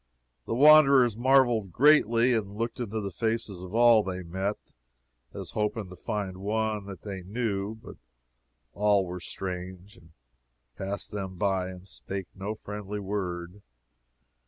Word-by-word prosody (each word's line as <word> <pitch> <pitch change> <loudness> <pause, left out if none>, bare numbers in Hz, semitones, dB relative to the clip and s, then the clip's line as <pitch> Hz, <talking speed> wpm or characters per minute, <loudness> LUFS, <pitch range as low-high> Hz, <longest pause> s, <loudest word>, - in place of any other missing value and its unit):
The - - -1
wanderers 140 -4 +7
marveled 120 -5 +3
greatly, 125 - +4
and 100 -3 -2
looked 115 +2 -3
into 110 -2 -3
the 100 -1 -4
faces 110 -2 -2
of 95 +3 -8
all 120 -2 +6
they 95 -2 -5
met, 95 +4 -3 0.7
as - - -7
hoping 105 -2 -2
to - - -9
find 100 -2 -4
one 105 +1 -1
that 100 -1 -9
they 100 -3 -6
knew; 100 +1 -3
but 110 - -12 0.8
all 105 -2 +2
were 90 0 -6
strange, 90 +2 -7
and 80 - -19 0.7
passed 100 +1 -5
them 95 -2 -5
by 95 -1 0
and 90 0 -10
spake 95 0 -6
no 100 +2 -5
friendly 105 0 -6
word. 95 -2 -4
105 Hz, 140 wpm, -28 LUFS, 95-115 Hz, 0.8 s, wanderers